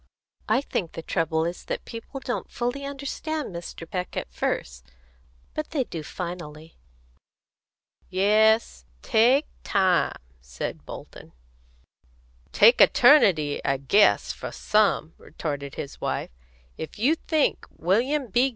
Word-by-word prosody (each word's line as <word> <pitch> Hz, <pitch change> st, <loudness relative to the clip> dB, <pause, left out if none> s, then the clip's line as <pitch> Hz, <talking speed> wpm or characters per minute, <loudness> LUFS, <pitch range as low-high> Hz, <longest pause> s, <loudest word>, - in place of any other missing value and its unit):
"I 255 Hz, -, +3 dB
think 180 Hz, -, -3 dB
the 165 Hz, -, -7 dB
trouble 160 Hz, 0 st, 0 dB
is 175 Hz, +1 st, -4 dB
that -, -, -4 dB
people 230 Hz, +4 st, -8 dB
don't 250 Hz, -2 st, -4 dB
fully 245 Hz, +4 st, -3 dB
understand 280 Hz, -, -4 dB
Mr. 170 Hz, -1 st, -8 dB
Peck 180 Hz, +1 st, -4 dB
at -, -, -5 dB
first. 60 Hz, 0 st, -3 dB, 0.7 s
But 305 Hz, -, -4 dB
they 285 Hz, -5 st, 0 dB
do 165 Hz, -9 st, -6 dB
finally." 165 Hz, -1 st, -7 dB, 1.3 s
"Yes; 215 Hz, +4 st, +3 dB, 0.2 s
take 245 Hz, +5 st, +4 dB, 0.2 s
time," 185 Hz, -4 st, +2 dB, 0.2 s
said 60 Hz, 0 st, -6 dB
Bolton. -, -, -10 dB, 1.2 s
"Take -, -, +6 dB
eternity, 190 Hz, -, +5 dB
I 135 Hz, -1 st, +1 dB
guess, 195 Hz, +11 st, +3 dB
for -, -, -7 dB
some," 205 Hz, -7 st, +1 dB
retorted 145 Hz, -3 st, -5 dB
his 140 Hz, -, -7 dB
wife. -, -, -2 dB, 0.5 s
"If 160 Hz, -, -7 dB
you 255 Hz, +9 st, +3 dB
think 315 Hz, -2 st, 0 dB
William 250 Hz, -, 0 dB
B. 250 Hz, +6 st, +3 dB
195 Hz, 120 wpm, -25 LUFS, 160-255 Hz, 1.3 s, Take